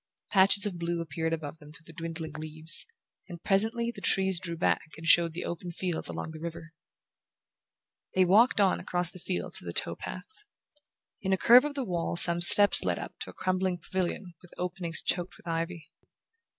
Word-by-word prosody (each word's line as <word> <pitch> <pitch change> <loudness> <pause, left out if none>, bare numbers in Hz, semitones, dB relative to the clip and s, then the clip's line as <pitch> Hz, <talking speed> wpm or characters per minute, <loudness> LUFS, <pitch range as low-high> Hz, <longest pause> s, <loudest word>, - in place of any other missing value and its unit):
Patches 200 +1 +5
of 185 -4 -5
blue 170 0 -3
appeared 160 0 -4
above 160 -1 -6
them 150 -2 -14
through 165 +2 -14
the 165 - -12
dwindling 165 -1 -7
leaves, 155 +1 0 0.4
and 170 -2 -10
presently 225 +4 +1
the - - -11
trees 190 -2 +2
drew 170 -2 -6
back 160 - -1
and 165 - -10
showed 165 -1 +4
the 175 - -5
open 175 +1 -6
fields 175 -1 -4
along 85 - -6
the 160 - -10
river. 165 0 -8 1.4
They 185 0 +4
walked 210 +6 +3
on 195 -2 +2
across 175 -1 -2
the 185 - -13
fields 180 +1 -2
to - - -15
the - - -5
tow - - -1
path. 435 -1 -10 0.8
In 190 0 -1
a - - +1
curve 245 +7 +6
of 295 -1 -5
the 270 -3 -3
wall 175 -4 -3
some 170 0 +4
steps 205 +4 +8
led - - -1
up - - -8
to - - -7
a - - -12
crumbling 185 -1 -2
pavilion 180 +1 -5
with 180 - -18
openings 180 -2 -4
choked 175 0 -3
with - - -21
ivy. 165 -1 -5
175 Hz, 190 wpm, -28 LUFS, 165-190 Hz, 1.4 s, steps